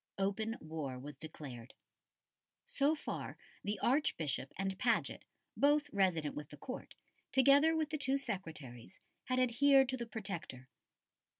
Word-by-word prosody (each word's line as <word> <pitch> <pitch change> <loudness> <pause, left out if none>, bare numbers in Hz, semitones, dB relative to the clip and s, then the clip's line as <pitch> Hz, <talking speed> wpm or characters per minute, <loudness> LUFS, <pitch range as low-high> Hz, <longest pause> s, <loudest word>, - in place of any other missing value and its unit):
Open 205 +4 0
war 155 -5 -5
was 145 +4 -7
declared. 135 -5 -9 0.9
So 285 +3 +2
far 310 - -5 0.3
the 205 +1 -1
Archbishop 160 - +1
and 195 0 -1
Paget, 240 - +1 0.3
both 295 +1 +3
resident 175 -7 +2
with 150 -1 -6
the 150 - -11
Court, 255 - -7 0.4
together 280 +4 +6
with 315 -2 0
the 310 - -2
two 275 -1 +2
Secretaries, 160 - -6 0.3
had 255 - 0
adhered 265 +2 +5
to 260 - -1
the 235 -1 -4
Protector. 185 - -5
205 Hz, 130 wpm, -35 LUFS, -, 0.9 s, together